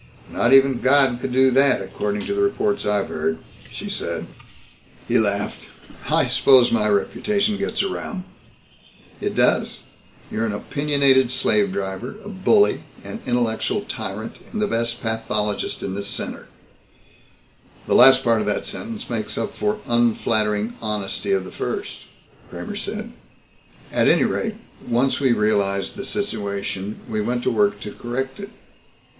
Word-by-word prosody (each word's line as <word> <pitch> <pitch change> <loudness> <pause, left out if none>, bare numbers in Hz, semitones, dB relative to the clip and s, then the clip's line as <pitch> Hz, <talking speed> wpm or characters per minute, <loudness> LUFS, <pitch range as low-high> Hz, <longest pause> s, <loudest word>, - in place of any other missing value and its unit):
"Not 120 - +1
even 135 -2 +5
God 130 -2 +4
could 130 - -3
do 130 +1 +4
that, 135 0 +4
according 100 +1 -3
to - - -2
the 200 - 0
reports 200 - 0
I've 105 -1 +1
heard," 80 - -1 0.3
she - - -6
said. - - -3 0.8
He 120 0 +3
laughed. 100 -1 -2 0.4
"I - - +3
suppose 130 -3 +5
my 105 -2 +2
reputation 205 - +1
gets 200 +1 -1
around." 195 0 -4 1.0
"It - - -2
does. - - +2 0.5
You're 115 +1 -1
an 105 - -2
opinionated 140 +2 +2
slave 105 -6 +2
driver, 95 +4 -4
a - - -6
bully, 210 - +3 0.2
an 225 - -7
intellectual 120 -2 0
tyrant, 105 +3 -6
and 215 - -4
the 210 - +2
best 115 - -2
pathologist 105 -2 -1
in 95 - -3
this 100 +1 -4
center." - - -5 1.4
"The - - 0
last 135 - +8
part 115 -2 +3
of 105 - -3
that 105 - -1
sentence 215 +2 -6
makes 115 -3 -3
up 205 - -2
for 210 0 -1
unflattering 110 -2 +1
honesty 105 -2 -2
of 95 -1 +1
the - - -9
first," - - -4 0.5
Kramer - - -6
said. - - -4 0.8
"At - - +2
any - - +5
rate, - - -1 0.3
once 125 +3 +1
we 135 -3 +3
realized 100 - +1
the 200 - -6
situation 100 - -3
we 110 -1 -2
went 120 +3 -1
to - - +1
work 105 -2 +2
to 105 - -6
correct 130 - -4
it. 200 0 -7
120 Hz, 150 wpm, -22 LUFS, 105-140 Hz, 1.4 s, last